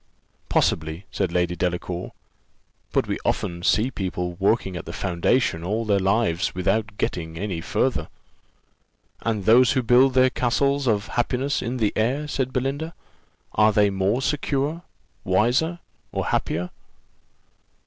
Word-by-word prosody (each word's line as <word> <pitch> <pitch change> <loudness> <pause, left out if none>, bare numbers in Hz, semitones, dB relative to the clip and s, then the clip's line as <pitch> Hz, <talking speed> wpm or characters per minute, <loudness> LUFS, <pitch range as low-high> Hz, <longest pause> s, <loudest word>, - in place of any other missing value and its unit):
"Possibly," 80 +4 0
said 95 -4 -1
Lady 90 0 0
Delacour; 90 0 -3 0.8
"but - - +1
we - - -2
often 85 0 -1
see 110 +8 +2
people 90 -4 -3
working 100 -1 +1
at 85 - -6
the - - -7
foundation 90 0 0
all 110 +6 -1
their 100 -2 +2
lives 95 -3 +1
without 100 +3 0
getting 80 -1 -3
any 95 -3 -3
farther." - - 0 1.1
"And 110 -4 -2
those 120 +3 +6
who 130 -2 +1
build 125 +3 +5
their 130 0 +5
castles 140 +3 +1
of 105 -3 +1
happiness 130 +4 0
in 125 +2 -3
the 110 -4 +1
air," 130 +7 0
said 130 -3 -2
Belinda, 140 +6 -2 0.6
"are 105 +2 +4
they 105 -1 +3
more 100 +7 0
secure, 145 +3 -1 0.4
wiser, 120 - +2 0.3
or - - -2
happier?" 90 +2 -1
110 Hz, 135 wpm, -24 LUFS, 90-130 Hz, 1.1 s, those